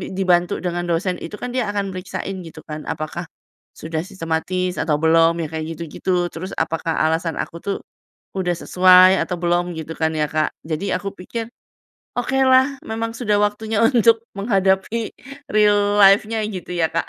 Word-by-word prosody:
dibantu 180 -2 +2
dengan 175 -1 -2
dosen 180 +2 0
itu, 210 +5 -7
kan 245 0 -6
dia 250 -5 0
akan 200 -2 -2
periksain 185 +1 -5
gitu 165 -2 -11
kan, 155 -1 -7
apakah 160 +2 -5 0.5
sudah 160 0 -3
sistematis 180 0 -2
atau 150 -2 +1
belum, 165 +2 +4
ya - - -4
kayak 160 0 -4
gitu-gitu. 175 +2 -1
Terus 185 +3 -6
apakah 165 0 -1
alasan 160 +1 0
aku 170 - -5
tuh 200 -1 -2 0.6
udah 180 -2 0
sesuai 185 +1 +6
atau 180 - -4
belum 175 0 +1
gitu 160 0 -6
kan 160 0 +1
ya 150 - +2
Kak. 155 0 +1 0.2
Jadi 165 +5 -2
aku 200 +1 -4
pikir, 225 +5 -5 0.7
"Okelah, 265 +2 +3
memang 225 +1 -3
sudah 210 -4 +1
waktunya 210 +1 0
untuk 230 -2 +4
menghadapi 195 +2 +1 0.4
real 205 -1 +3
life-nya 210 +3 +5
gitu 185 -4 -6
ya 165 -1 +2
Kak? - - -1
185 Hz, 160 wpm, -21 LUFS, 165-205 Hz, 0.7 s, sesuai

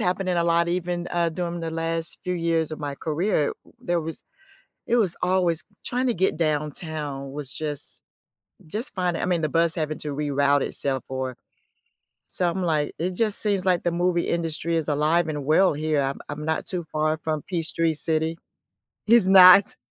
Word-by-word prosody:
happening 180 0 0
a 170 - +3
lot 170 0 +3
even, 175 0 -2
uh, 170 -1 +2
during 170 +1 -3
the 165 0 -3
last 165 0 -3
few 180 0 -1
years 165 -2 0
of 155 - -5
my 145 -1 -3
career. 160 0 0 0.3
There 175 -1 0
was 160 0 -6 0.7
it 240 - +3
was 195 -7 +1
always 180 -3 +1 0.2
trying 250 +1 -1
to 240 - +1
get 190 +1 +1
downtown 150 -2 -3
was 145 -2 -6
just 150 -2 -6 0.7
just 225 - -5
fine. 180 -2 0
I - - -1
mean, 175 -2 +1
the 155 - 0
bus 165 +2 +2
having 155 -2 -2
to 150 -2 -4
reroute 145 -1 +2
itself 135 -2 -2
or 130 -1 -3 0.9
something 180 +1 -1
like 155 -3 0
it 180 +3 -1
just 215 +1 0
seems, 200 -3 0
like, 180 -2 +3
the 175 - +2
movie 175 0 +1
industry 165 0 -1
is 160 - -1
alive 155 +3 +2
and 150 -3 -3
well 185 +5 +4
here. 155 -1 0
I'm 135 0 -3
I'm 150 +1 -5
not 160 0 -1
too 175 -3 -4
far 155 0 +1
from 155 -2 -1
Peachtree 165 -2 0
City 160 +1 -1 0.7
is 230 -3 +5
not 190 +1 +8
165 Hz, 180 wpm, -24 LUFS, 155-180 Hz, 0.9 s, not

